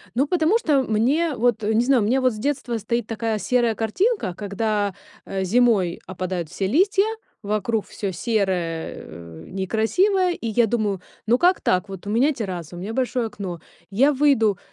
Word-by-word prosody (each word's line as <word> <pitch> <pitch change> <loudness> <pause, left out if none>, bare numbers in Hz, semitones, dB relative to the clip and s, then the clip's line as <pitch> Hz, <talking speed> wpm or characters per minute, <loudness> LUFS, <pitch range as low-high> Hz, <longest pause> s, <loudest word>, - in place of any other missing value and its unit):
Ну, 275 +4 +2
потому 350 +6 +2
что 295 - +2
мне 270 +9 +1
вот, 235 -2 +1
не 220 +3 +2
знаю, 255 -4 +3
у - - 0
меня 260 +4 +2
вот 255 -2 +2
с 215 - -8
детства 255 -2 -2
стоит 235 +2 -2
такая 225 -1 -2
серая 240 -1 +1
картинка, 225 - 0
когда, 205 0 -1 0.3
э, 190 -1 -2
зимой 205 -4 +2
опадают 185 -3 -4
все 195 - -2
листья, 385 - +3 0.4
вокруг 210 +1 -1
всё 195 -2 -4
серое, 180 -5 -1
э, 85 0 -11
некрасивое. 350 - +1
И 230 - -5
я 230 +2 +3
думаю: 210 -4 -1 0.3
ну 240 +3 +3
как 360 +1 +3
так? 185 +2 +1
Вот 195 0 -9
у - - -3
меня 265 +8 +3
терраса, 180 - -5
у - - -7
меня 200 +5 -5
большое 250 -1 -1
окно, 185 -6 -6 0.3
я 270 +9 +4
выйду, 255 -8 +3
220 Hz, 175 wpm, -23 LUFS, 195-260 Hz, 0.4 s, я